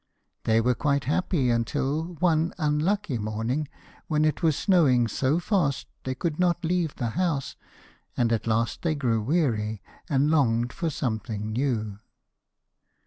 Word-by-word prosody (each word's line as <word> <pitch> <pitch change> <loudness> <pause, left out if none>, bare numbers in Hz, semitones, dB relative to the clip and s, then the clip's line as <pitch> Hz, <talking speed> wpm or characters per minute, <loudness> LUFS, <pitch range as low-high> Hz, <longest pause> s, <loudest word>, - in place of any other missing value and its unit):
They 110 0 +4
were 125 +2 +2
quite 140 +3 0
happy 145 -3 +1
until 145 +8 -1
one 165 0 +1
unlucky 155 - 0
morning 115 +8 -2 0.4
when 155 -1 +2
it 155 - 0
was 160 -4 +3
snowing 135 - +3
so 130 +7 +1
fast 175 -8 0 0.2
they 130 0 -2
could 155 +3 -3
not 175 -1 +1
leave 170 -2 0
the 120 -3 -2
house, 165 -5 -1 0.6
and 115 -1 +2
at 115 0 -1
last 115 0 0
they 160 -3 0
grew 120 -6 0
weary, 110 - 0 0.3
and 145 +1 +2
longed 120 -6 +2
for 165 - -2
something 110 -5 -3
new. 110 -5 -1
140 Hz, 140 wpm, -26 LUFS, 115-160 Hz, 0.6 s, They